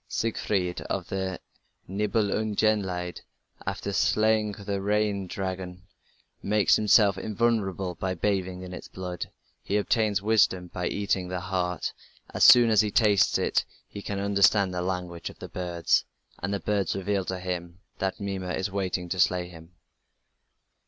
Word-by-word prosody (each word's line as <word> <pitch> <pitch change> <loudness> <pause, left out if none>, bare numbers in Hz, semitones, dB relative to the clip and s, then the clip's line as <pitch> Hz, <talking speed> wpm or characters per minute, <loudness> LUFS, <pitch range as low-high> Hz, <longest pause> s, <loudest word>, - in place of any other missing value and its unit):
Siegfried 100 -5 -1
of - - -3
the 95 -1 -3 0.5
Nibelungenlied, 100 -2 0 0.5
after 100 - -3
slaying 110 +5 +2
the 100 -1 -4
Regin 105 -1 0
dragon, 95 -1 -5 0.6
makes 105 0 +3
himself 105 -2 +4
invulnerable 100 -4 0
by 95 +1 -3
bathing 95 0 -1
in 90 0 -8
its - - -8
blood. 90 -1 -6 0.3
He 100 - -1
obtains 105 -1 +1
wisdom 100 -4 +2
by 90 -1 -2
eating 100 -2 -1
the 90 0 -3
heart: 90 -2 -2 0.4
as - - +1
soon 120 -2 +8
as 110 -1 +6
he 105 - 0
tastes 105 -3 +4
it - - +1 0.2
he 100 - -8
can 100 0 -4
understand 100 -1 +3
the 90 - -2
language 90 -2 -3
of - - -13 0.2
birds, 85 -8 +1 0.4
and 100 - -3
the 100 - -1
birds 100 +1 0
reveal 100 0 -1
to 95 - -3
him 90 -1 -4 0.2
that 95 0 -2
Mimer 95 -3 -3
is 95 +1 -2
waiting 95 -2 -2
to 95 - -3
slay 90 0 +2
him. 85 0 -14
95 Hz, 145 wpm, -27 LUFS, 90-105 Hz, 0.6 s, soon